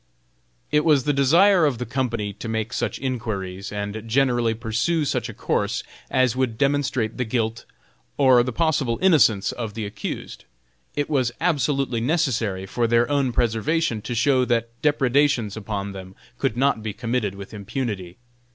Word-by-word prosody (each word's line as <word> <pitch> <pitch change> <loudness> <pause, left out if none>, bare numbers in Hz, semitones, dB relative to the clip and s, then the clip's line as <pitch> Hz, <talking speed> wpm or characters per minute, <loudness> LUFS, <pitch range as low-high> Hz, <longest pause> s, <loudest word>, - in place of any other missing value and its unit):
It 150 0 +3
was 150 -5 +4
the 145 - +1
desire 170 +7 +5
of 145 -5 +2
the 125 - -4
company 115 -4 -2
to 105 +3 -7
make 110 +1 -2
such 120 -3 -2
inquiries, 100 -7 -4
and 105 +1 -4
generally 120 -2 +2
pursue 115 +8 0
such - - -1
a - - -7
course - - -1 0.3
as 130 -2 +2
would 130 -4 -1
demonstrate 135 -5 0
the 125 - 0
guilt 115 -1 -2 0.5
or 130 -3 +6
the 125 +1 -2
possible 140 -5 +1
innocence 135 - +4
of 115 -4 -5
the 110 -2 -3
accused. 100 0 -6 0.5
It 145 - -1
was 130 -6 +1
absolutely 135 -6 0
necessary 115 - 0
for 115 +5 -1
their 120 +1 +3
own 140 -3 +2
preservation 115 +2 0
to 120 - -4
show 130 +2 +3
that 115 -2 0
depredations 140 -6 +2
upon 100 -2 -4
them 95 -1 -10 0.2
could 110 - -1
not 135 -3 +2
be 105 -1 -4
committed 115 -2 -2
with 100 +1 -10
impunity. 100 -4 -4
120 Hz, 160 wpm, -23 LUFS, 110-140 Hz, 0.5 s, or